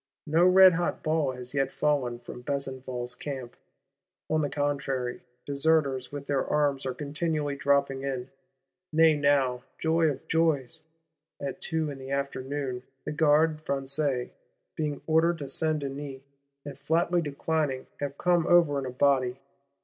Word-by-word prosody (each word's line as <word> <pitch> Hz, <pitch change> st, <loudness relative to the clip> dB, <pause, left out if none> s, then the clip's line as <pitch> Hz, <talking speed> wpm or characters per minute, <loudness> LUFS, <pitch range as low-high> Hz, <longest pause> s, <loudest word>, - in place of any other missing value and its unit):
No 165 Hz, +4 st, +4 dB
redhot 185 Hz, -2 st, +5 dB
ball 155 Hz, -4 st, +1 dB
has 125 Hz, 0 st, -8 dB
yet 135 Hz, -1 st, +1 dB
fallen 135 Hz, -5 st, 0 dB
from 120 Hz, 0 st, -10 dB
Besenval's 130 Hz, -2 st, -4 dB
Camp; 130 Hz, -2 st, -6 dB, 0.8 s
on 155 Hz, 0 st, +3 dB
the 145 Hz, -, 0 dB
contrary, 140 Hz, -4 st, -2 dB, 0.2 s
Deserters 140 Hz, -2 st, +1 dB
with 145 Hz, -1 st, -6 dB
their 140 Hz, -2 st, 0 dB
arms 140 Hz, -3 st, 0 dB
are 130 Hz, -, -2 dB
continually 150 Hz, 0 st, -2 dB
dropping 140 Hz, -1 st, +1 dB
in: 135 Hz, -2 st, -4 dB, 0.6 s
nay 160 Hz, 0 st, +5 dB
now, 140 Hz, -4 st, +2 dB, 0.2 s
joy 160 Hz, 0 st, +2 dB
of 140 Hz, -, -6 dB
joys, 160 Hz, -3 st, +1 dB, 0.6 s
at 140 Hz, -2 st, -5 dB
two 160 Hz, -3 st, -1 dB
in 135 Hz, -, -8 dB
the 130 Hz, 0 st, -8 dB
afternoon, 140 Hz, -1 st, -3 dB, 0.2 s
the -, -, -2 dB
Gardes 155 Hz, 0 st, +3 dB
Françaises, 140 Hz, -2 st, -1 dB, 0.4 s
being 150 Hz, -3 st, -2 dB
ordered 165 Hz, +2 st, +3 dB
to 145 Hz, -3 st, -6 dB
Saint 155 Hz, +2 st, -1 dB
Denis, 135 Hz, -1 st, -6 dB, 0.4 s
and 140 Hz, -2 st, -8 dB
flatly 170 Hz, +4 st, +1 dB
declining, 145 Hz, -2 st, -1 dB
have 145 Hz, -1 st, -4 dB
come 175 Hz, -2 st, +2 dB
over 165 Hz, -5 st, +5 dB
in 135 Hz, -, -4 dB
a -, -, -3 dB
body! 130 Hz, -1 st, +2 dB
140 Hz, 140 wpm, -28 LUFS, 135-155 Hz, 0.8 s, redhot